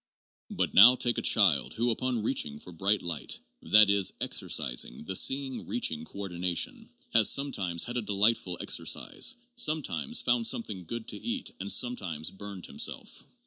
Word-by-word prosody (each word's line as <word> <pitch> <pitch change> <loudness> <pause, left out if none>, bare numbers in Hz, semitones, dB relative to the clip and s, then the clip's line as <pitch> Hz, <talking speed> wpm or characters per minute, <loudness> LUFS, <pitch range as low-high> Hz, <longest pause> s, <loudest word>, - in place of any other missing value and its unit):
But - - -2
now 120 +6 +9
take 120 -1 0
a - - -4
child 95 -10 +3
who, 120 +1 0
upon 120 -1 -2
reaching 75 - -1
for 90 - -12
bright 100 +4 0
light 85 -3 -3 0.2
(that 105 0 +6
is, 100 -1 +2
exercising 60 +2 -2
the 95 +4 -4
see 135 +8 +3
ing 130 -2 -8
reaching 80 -10 -1
coordination) 95 - -3 0.2
has - - +6
sometimes 95 -12 +1
had 120 +1 -4
a - - -1
delightful 100 -3 0
exer - - -1
cise, 260 - -1 0.2
sometimes 150 - 0
found 120 -1 +1
something 105 -6 -3
good 115 +4 -6
to - - -3
eat 240 +1 -4
and 100 +1 -3
sometimes 90 -11 -1
burned 100 -2 -8
himself. - - -4
105 Hz, 160 wpm, -28 LUFS, 90-120 Hz, 0.2 s, now